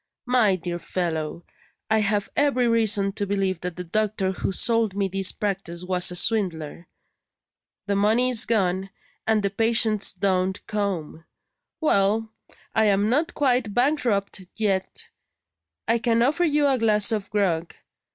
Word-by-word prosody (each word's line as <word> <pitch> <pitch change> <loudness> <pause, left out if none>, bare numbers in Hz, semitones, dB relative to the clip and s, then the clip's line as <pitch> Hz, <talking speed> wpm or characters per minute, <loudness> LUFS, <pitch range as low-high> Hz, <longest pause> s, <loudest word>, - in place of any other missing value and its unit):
My 245 -6 +3
dear 175 -1 -5
fellow, 170 -2 -4 0.4
I 220 0 +2
have 205 -1 0
every 275 -4 +2
reason 215 -4 +2
to 200 +1 -1
believe 195 -2 -1
that 180 -1 -5
the 180 - -6
doctor 200 +1 -1
who 190 - -3
sold 225 +1 +1
me 200 -1 0
this 195 0 0
practice 190 -4 -4
was 180 0 +1
a 180 - -5
swindler. 175 -6 0 1.0
The 200 - -1
money 220 +5 +2
is 235 -2 +3
gone, 190 -3 0 0.4
and 220 -2 +2
the 200 - 0
patients 220 -1 +2
don't 190 0 -1
come. 185 -6 -4 0.5
Well! 220 - +1 0.4
I 220 -1 +3
am 205 +1 +2
not 315 +7 0
quite 250 -7 0
bankrupt 245 -8 0
yet; 195 -4 -2 0.8
I 230 +1 +2
can 230 0 +2
offer 305 +7 +1
you 295 -2 +2
a 265 -2 +1
glass 215 -1 +3
of 210 -3 -3
grog. 175 -5 -1
205 Hz, 145 wpm, -24 LUFS, 190-230 Hz, 1.0 s, My